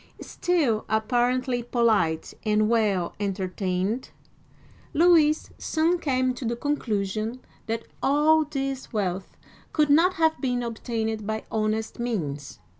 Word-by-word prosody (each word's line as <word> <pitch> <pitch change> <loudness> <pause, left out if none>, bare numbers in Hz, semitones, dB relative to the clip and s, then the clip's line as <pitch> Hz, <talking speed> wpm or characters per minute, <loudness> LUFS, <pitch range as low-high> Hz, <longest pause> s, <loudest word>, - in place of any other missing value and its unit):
*' - - -30
Still 300 -12 0
apparently 245 +3 +1
polite 220 -10 +1
and 215 0 +2
well 210 -6 +1
entertained, 195 +2 -2 0.9
Louis 315 -2 +4
soon 330 +3 +1
came 255 -4 +1
to 250 - -8
the 235 0 -1
conclusion 225 -4 -2 0.3
that 225 0 -2 0.2
all 305 +3 +4
this 275 -3 -4
wealth 190 -3 -3 0.4
could 300 -2 +3
not 345 +5 +5
have 320 -1 +2
been 245 -3 0
obtained 225 -2 -3
by 220 0 -2
honest 220 +1 -1
means. 155 - -3
235 Hz, 115 wpm, -25 LUFS, 215-275 Hz, 0.9 s, not